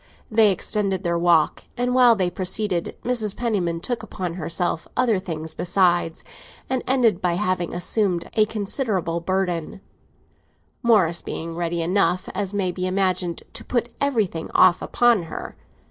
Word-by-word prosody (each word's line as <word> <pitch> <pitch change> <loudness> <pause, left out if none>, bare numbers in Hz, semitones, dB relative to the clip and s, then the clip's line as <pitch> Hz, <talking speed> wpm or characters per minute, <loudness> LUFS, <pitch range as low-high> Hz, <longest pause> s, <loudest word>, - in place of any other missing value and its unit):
They 220 -1 +5
extended 195 0 -1
their 170 -1 0
walk, 170 -3 +2
and, 245 +1 0
while 250 -2 +6
they 185 -3 0
proceeded, 185 -1 -2
Mrs. 225 -5 0
Penniman 185 -8 -1
took 245 +4 -3
upon 180 -3 -5
herself 170 0 -2
other 235 -6 +3
things 160 -4 -5
besides, 175 -2 +1 0.4
and 260 -1 -1
ended 235 -7 +3
by 180 -2 +1
having 185 -2 -1
assumed 180 -1 0
a 215 -1 +3
considerable 200 - -2
burden; 180 -1 -2 1.0
Morris 190 -8 +3
being 165 0 -5
ready 170 0 -1
enough, 180 0 +1
as 195 0 -2
may 195 -3 0
be 180 +1 -3
imagined, 185 -2 -1
to - - -7
put 240 -1 -2
everything 220 -12 0
off 185 -1 +5
upon 240 -4 +3
her. - - -7
185 Hz, 145 wpm, -23 LUFS, 170-215 Hz, 1.0 s, while